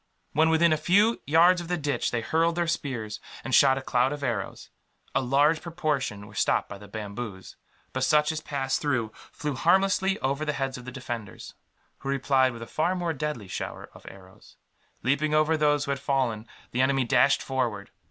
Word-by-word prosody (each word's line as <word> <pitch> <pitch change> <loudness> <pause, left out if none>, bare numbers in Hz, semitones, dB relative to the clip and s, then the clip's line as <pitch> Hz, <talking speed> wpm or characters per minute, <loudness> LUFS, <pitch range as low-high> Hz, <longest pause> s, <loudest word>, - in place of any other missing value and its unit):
When 160 +3 +4
within 160 0 +4
a - - +1
few 205 +8 +3
yards 175 +4 +5
of 170 - -8
the 180 +1 -1
ditch 145 -2 -1
they 120 - -2
hurled 165 +7 +1
their 175 0 +1
spears, 125 -10 -3 0.2
and 130 - -5
shot 135 0 +6
a 135 - -5
cloud 125 +1 +2
of 145 -1 -5
arrows. 115 -7 -4 0.4
A - - +2
large 145 +5 +3
proportion 150 -11 -2
were 105 - -14
stopped - - +1
by 100 - -9
the 105 - -12
bamboos, 100 -1 -7 0.4
but 130 - -1
such 150 +2 +3
as 155 -1 -4
passed 135 -3 -2
through 130 -7 0 0.2
flew 150 -1 -4
harmlessly 190 +6 +2
over 140 +3 -1
the 150 -1 -1
heads 135 -1 -2
of 125 - -9
the 125 - -6
defenders; 120 -5 -7 0.5
who 135 - -6
replied 135 -1 +2
with 115 -1 -8
a - - -7
far 170 +9 0
more 175 -2 -1
deadly 150 -8 -4
shower - - -6
of - - -15
arrows. 95 -1 -16 0.5
Leaping 145 +4 +1
over 155 +1 +3
those 145 -1 +2
who 140 - -2
had 140 - -2
fallen, 130 -6 -1 0.2
the 125 - 0
enemy 135 0 +2
dashed 130 +2 +3
forward. 120 -7 -2
140 Hz, 195 wpm, -27 LUFS, 120-155 Hz, 0.5 s, shot